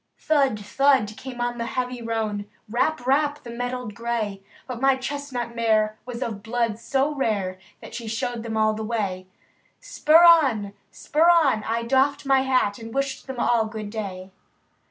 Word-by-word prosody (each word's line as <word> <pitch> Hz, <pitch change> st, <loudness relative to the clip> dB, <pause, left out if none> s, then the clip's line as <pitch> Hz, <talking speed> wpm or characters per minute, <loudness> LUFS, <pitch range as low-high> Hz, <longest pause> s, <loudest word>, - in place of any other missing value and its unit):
Thud! 275 Hz, -8 st, +1 dB
thud! 215 Hz, 0 st, +2 dB
came 255 Hz, 0 st, -8 dB
on 240 Hz, 0 st, -2 dB
the 230 Hz, -, -2 dB
heavy 250 Hz, -1 st, -2 dB
roan. 220 Hz, -3 st, -3 dB, 0.2 s
Rap! 245 Hz, +4 st, 0 dB
rap! 290 Hz, +2 st, +1 dB
the 235 Hz, -, -8 dB
mettled 245 Hz, -1 st, -4 dB
gray; 220 Hz, -3 st, -3 dB, 0.2 s
But 250 Hz, -2 st, -6 dB
my 270 Hz, 0 st, +4 dB
chestnut 260 Hz, -3 st, -4 dB
mare 215 Hz, -2 st, +1 dB
was 245 Hz, 0 st, -4 dB
of 215 Hz, -4 st, -5 dB
blood 230 Hz, 0 st, -1 dB
so 275 Hz, +5 st, 0 dB
rare. 200 Hz, -9 st, -1 dB, 0.2 s
That -, -, -11 dB
she 235 Hz, -2 st, -6 dB
showed 225 Hz, +2 st, -3 dB
them 225 Hz, -1 st, -4 dB
all 215 Hz, 0 st, +3 dB
the 220 Hz, +1 st, -5 dB
way. 200 Hz, -5 st, -3 dB, 0.5 s
Spur 320 Hz, +3 st, +4 dB
on! 260 Hz, -12 st, +5 dB, 0.2 s
spur 320 Hz, +3 st, +2 dB
on! 295 Hz, -11 st, +4 dB
— -, -, -8 dB
I 230 Hz, +1 st, -1 dB
doffed 265 Hz, +4 st, +1 dB
my 270 Hz, -1 st, +4 dB
hat, 255 Hz, -6 st, +1 dB
And 225 Hz, 0 st, -8 dB
wished 275 Hz, +2 st, -3 dB
them 260 Hz, -2 st, -6 dB
all 235 Hz, -2 st, +2 dB
good 215 Hz, -1 st, -6 dB
day. 195 Hz, -4 st, -6 dB
235 Hz, 175 wpm, -24 LUFS, 215-265 Hz, 0.5 s, on